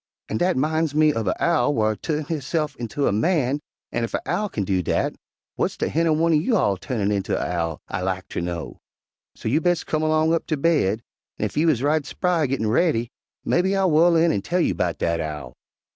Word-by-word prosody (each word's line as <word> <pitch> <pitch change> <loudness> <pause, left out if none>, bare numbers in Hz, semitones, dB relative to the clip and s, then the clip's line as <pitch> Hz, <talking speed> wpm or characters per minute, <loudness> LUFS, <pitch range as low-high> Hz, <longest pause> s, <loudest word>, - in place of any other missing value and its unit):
An' 110 - -1
dat 180 +3 +1
'mines 155 +1 0
me 155 0 +5
uv 115 -7 -2
a 90 - -1
owl 160 -3 +2
whar 110 -1 +1
turnt 150 +4 -3
hisse'f 150 -1 -2
inter 120 +4 -2
a - - +3
man, 140 - +1 0.3
an' 120 - -1
ef 115 - -2
a - - -2
owl 205 +4 0
kin 105 - -2
do 95 -1 0
dat, - - 0 0.5
w'ats - - 0
ter - - -1
hinner 165 +2 +2
one'r 165 +2 +3
you 220 +6 +2
all 100 - +2
turnin' 105 0 -2
inter 100 -2 0
a - - -1
owl, 85 -3 -2
I 90 - -3
lak 95 0 -2
ter - - -4
know? 85 -7 -5 0.6
So - - -6
you 145 +8 +2
bes' 175 -1 +1
come 155 - -1
'long 155 +1 +2
up 165 - -1
ter 155 - 0
baid, 140 - +1 0.3
an' - - -1
ef - - -5
you 160 +2 +3
is 135 -5 +1
right 150 +1 +2
spry 165 +2 0
gettin' 130 -4 -1
raidy, 120 0 +1 0.3
mebbe 190 +3 +2
I'll 190 -2 +2
whu'l 165 +3 +5
in 165 0 +4
an' 100 - 0
tell 175 - -1
you - - +2
'bout 85 -2 -1
dat 85 0 0
owl." 75 -6 -5
145 Hz, 225 wpm, -23 LUFS, 105-165 Hz, 0.6 s, me